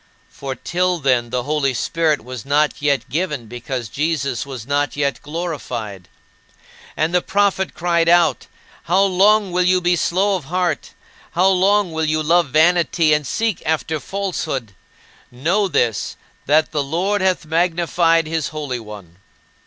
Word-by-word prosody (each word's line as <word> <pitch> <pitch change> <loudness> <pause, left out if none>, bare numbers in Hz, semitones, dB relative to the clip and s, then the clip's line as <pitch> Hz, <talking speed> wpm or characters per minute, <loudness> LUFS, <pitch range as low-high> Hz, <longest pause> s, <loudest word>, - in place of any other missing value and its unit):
For 135 -1 -6
till 180 +3 -1
then 130 -5 +1
"the 125 0 -2
Holy 145 -2 0
Spirit 155 +2 0
was 125 -1 -7
not 150 +2 +1
yet 145 -2 +1
given, 150 -6 -2
because 120 +1 -5
Jesus 140 -1 -2
was 130 -5 -7
not 145 +1 -1
yet 140 -1 -1
glorified." 125 - -5 0.9
And 160 +2 0
the 180 - +3
prophet 195 0 0
cried 170 -1 +1
out: 170 -7 +3 0.4
"How 185 +4 +3
long 200 +1 +3
will 180 +1 +1
you 185 0 +3
be 175 0 +2
slow 195 +4 +1
of 175 -7 -5
heart? 180 +3 -2 0.4
How 185 +3 +4
long 195 0 +2
will 160 0 -1
you 155 0 0
love 170 0 +3
vanity, 165 +1 +3
and 150 -2 0
seek 225 - -1
after 160 0 -1
falsehood? 160 - -4 0.6
Know 170 +12 0
this, 115 - 0 0.3
that 155 +3 +3
the 150 -2 0
Lord 185 +8 -1
hath 185 -2 +1
magnified 165 0 +2
his 160 -1 -2
Holy 145 -5 -4
One." 105 -6 -11
160 Hz, 150 wpm, -19 LUFS, 140-180 Hz, 0.9 s, How